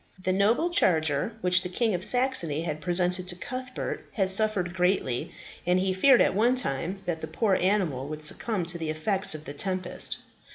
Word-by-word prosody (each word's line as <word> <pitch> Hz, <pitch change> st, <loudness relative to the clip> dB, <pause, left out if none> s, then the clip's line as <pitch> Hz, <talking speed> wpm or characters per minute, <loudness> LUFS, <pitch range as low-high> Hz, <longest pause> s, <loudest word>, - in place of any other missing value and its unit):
The 185 Hz, -, +1 dB
noble 225 Hz, -, +2 dB
charger 160 Hz, -, +1 dB
which 180 Hz, 0 st, +4 dB
the 180 Hz, -, -5 dB
King 225 Hz, +3 st, 0 dB
of 180 Hz, 0 st, -2 dB
Saxony 210 Hz, -, +2 dB
had 155 Hz, -2 st, -4 dB
presented 180 Hz, +1 st, +1 dB
to 180 Hz, -, -1 dB
Cuthbert, 255 Hz, +6 st, -6 dB
had 190 Hz, -3 st, +2 dB
suffered 195 Hz, -3 st, +1 dB
greatly, 180 Hz, -9 st, 0 dB, 0.3 s
and 180 Hz, +1 st, +2 dB
he 190 Hz, 0 st, 0 dB
feared 250 Hz, +7 st, +5 dB
at -, -, +3 dB
one 235 Hz, +6 st, +2 dB
time, 185 Hz, -, -2 dB
that 165 Hz, -2 st, -3 dB
the -, -, -5 dB
poor 215 Hz, -4 st, 0 dB
animal 180 Hz, -9 st, 0 dB
would 155 Hz, 0 st, -5 dB
succumb 185 Hz, +4 st, -2 dB
to 170 Hz, 0 st, -3 dB
the 160 Hz, -1 st, -3 dB
effects 190 Hz, +4 st, +1 dB
of 155 Hz, 0 st, -9 dB
the 145 Hz, -, -6 dB
tempest. 185 Hz, +3 st, -1 dB
185 Hz, 190 wpm, -27 LUFS, 165-210 Hz, 0.3 s, feared